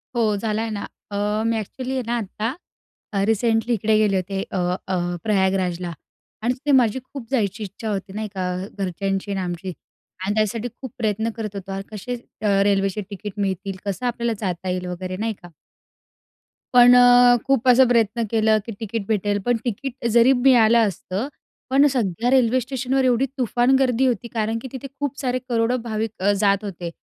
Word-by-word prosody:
हो, 220 -3 +2
झाला 215 +1 -1
आहे 225 - -2
ना. 205 - -4 0.3
अ, 210 +2 -1
मी 230 0 +1
एक्चुअली 255 +5 -5
आहे 260 - 0
ना 240 +1 -1
आता, 220 +2 -3 0.6
अ, 195 -1 +1
रिसेंटली 225 +1 +1
इकडे 215 +1 +2
गेले 210 -2 +3
होते, 195 +1 -2
अ, - - -4 0.3
अ, 190 - 0 0.3
प्रयागराजला 190 -4 0 0.5
आणि 240 - +2
तिथे 285 +3 -1
माझी 250 -3 +4
खूप 260 -3 -9
जायची 215 -4 0
इच्छा 205 +3 -6
होती 195 -1 -4
नाही 215 +1 -4
का, 185 -1 -2
अ, - - -6
घरच्यांची 195 +1 -2
आणि 195 -1 -1
आमची 180 +1 -4 0.5
आणि 205 - 0
त्यासाठी 215 +2 0
खूप 260 -4 -7
प्रयत्न 220 0 0
करत 215 -3 -5
होतो 195 0 -6
अन 195 - -3
कसे 220 +4 -5 0.3
अ, - - 0 0.2
रेल्वेचे 195 0 +1
तिकीट 205 +1 -6
मिळतील? 195 0 -2
कसं 200 +5 -3
आपल्याला 235 -1 -1
जाता 185 -2 -3
येईल 180 0 -2
वगैरे 185 +1 -5
नाही 220 +3 -1
का. 175 - -12 1.2
पण 245 0 +8
अ, 245 0 +7
खूप 265 -2 +1
असं 255 +1 +7
प्रयत्न 230 -1 +2
केला, 220 -1 +3
की 230 - -6
तिकीट 220 -1 -4
भेटेल 205 -1 0
पण 245 -1 +2
तिकीट 245 +2 -4
जरी 240 +3 +6
मिळालं 235 -3 +5
असतं 195 +4 -4 0.4
पण 275 +2 +5
सगळ्या 240 - 0
रेल्वे 255 -1 +4
स्टेशनवर 265 +1 -1
एवढी 255 +1 +3
तुफान 250 +1 +2
गर्दी 255 -1 +2
होती 240 -1 -1
कारण 225 0 -1
की - - -6
तिथे 265 0 -6
खूप 285 -1 -3
सारे 255 -1 -1
करोडो 235 +1 +1
भाविक 220 -1 -2
अ, 195 +2 +3
जात 200 0 +2
होते. 180 -4 -5
220 Hz, 180 wpm, -22 LUFS, 195-245 Hz, 1.2 s, पण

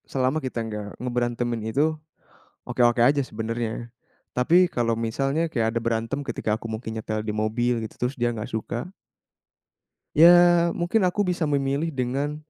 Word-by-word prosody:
Selama 130 +4 0
kita 125 -4 -3
nggak 105 -2 -5
ngeberantemin 120 -1 -1
itu, 155 +3 +1 0.7
oke-oke 120 -1 +2
aja 140 +3 +4
sebenernya. 115 0 -4 0.4
Tapi 175 +8 +4
kalau 115 -1 0
misalnya 135 +8 -1
kayak 115 -4 0
ada - - +2
berantem 115 +4 -1
ketika 110 -5 -2
aku 110 - -10
mungkin 110 0 -5
nyetel 110 0 -3
di 105 - -2
mobil 115 +2 0
gitu, 120 +3 -3
terus 135 - -7
dia 120 -1 0
nggak 110 -2 -5
suka 120 - -4 1.2
ya 175 +1 +7
mungkin 185 +3 +1
aku 205 +3 0
bisa 180 -4 -1
memilih 140 +2 0
dengan, 140 0 -2
125 Hz, 150 wpm, -24 LUFS, 115-150 Hz, 1.2 s, ya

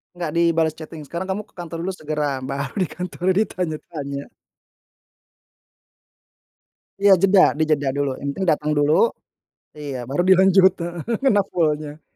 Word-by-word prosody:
Nggak 170 -3 -4
dibalas 165 -2 +2
chatting, 155 0 -9
"Sekarang 170 +5 -5
kamu 195 +3 -2
ke - - -32
kantor 170 -2 -7
dulu 190 - -2
segera!" 150 -2 -2 0.2
Baru 140 +1 -4
di - - -2
kantor 180 -1 -6
ditanya-tanya. 155 -7 -3 2.7
Iya, 200 0 +5
jeda, 195 -1 +6 0.2
dijeda 155 -3 +1
dulu. 140 -1 0
Yang 140 - -5
penting 190 - -2
datang 150 0 -1
dulu. 145 +1 +3 0.9
Iya, 145 -3 -5
baru 145 +6 0
dilanjut 190 0 +6
heeh, 170 0 -4 0.2
kena 210 -6 +4
full-nya. 155 -2 -1
165 Hz, 135 wpm, -22 LUFS, 150-185 Hz, 2.7 s, jeda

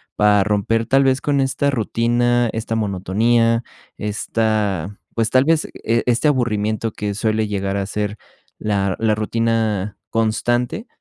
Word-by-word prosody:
para 105 -1 +4
romper, 105 +2 +1
tal 135 +2 +3
vez, 135 0 +2
con 140 0 +1
esta 135 +1 0
rutina, 120 0 +1
esta 115 0 -3
monotonía, 115 +3 +1 0.3
esta, 105 -3 -1 0.2
pues, 115 -1 0
tal 130 0 +4
vez, 160 +1 +2
e 115 +1 -1
este 125 +5 +2
aburrimiento 110 -4 0
que 105 -1 -3
suele 110 +1 0
llegar 100 -1 -2
a 100 - -1
ser 105 +1 -3 0.4
la 100 -3 0
la 110 -1 +2
rutina 110 -2 -1
constante. 120 - 0
110 Hz, 135 wpm, -20 LUFS, 105-120 Hz, 0.4 s, para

